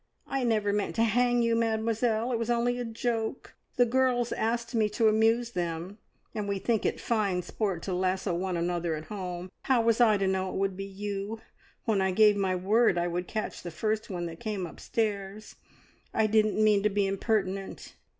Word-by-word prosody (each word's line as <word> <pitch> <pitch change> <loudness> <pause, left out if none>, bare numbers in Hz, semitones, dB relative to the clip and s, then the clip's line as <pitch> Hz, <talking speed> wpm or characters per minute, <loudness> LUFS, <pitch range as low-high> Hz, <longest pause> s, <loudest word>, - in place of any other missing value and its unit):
"I 270 -1 -2
never 215 -4 +1
meant 205 -1 -1
to 230 - +3
hang 240 +1 +3
you, 230 0 +2
Mademoiselle! 225 +1 0
It 235 - 0
was 230 0 -2
only 240 +1 +1
a - - -1
joke. 230 0 -3 0.2
The 245 - +5
girls 245 -1 +1
asked 230 +2 -1
me 220 -2 +2
to 220 +2 +2
amuse 225 +2 +3
them, 175 +2 -4 0.3
and 210 -2 -3
we 200 -1 -1
think 220 +3 0
it - - -2
fine 200 -6 0
sport 195 -5 -2
to 190 - -3
lasso 185 +1 0
one 180 +1 -1
another 170 -1 -1
at 155 0 -7
home. 180 -2 -5
How 250 -3 +3
was 230 +1 +3
I 215 -3 +5
to 195 - 0
know 190 0 0
it - - -6
would 195 -1 0
be 195 +1 -5
you, 200 +2 -5 0.5
when 210 -3 +2
I 190 - +2
gave 210 +2 +5
my 190 -2 0
word 200 +2 +3
I 175 0 +1
would 175 +1 -3
catch 215 -1 -4
the 175 - -6
first 215 +6 -2
one 175 -3 -3
that 165 -1 -7
came 210 -5 -3
upstairs? 205 +3 -3 0.6
I 220 - +3
didn't 215 0 +2
mean 210 -2 +4
to 210 - +2
be 205 0 +1
impertinent." 195 -1 -2
210 Hz, 200 wpm, -28 LUFS, 190-230 Hz, 0.6 s, The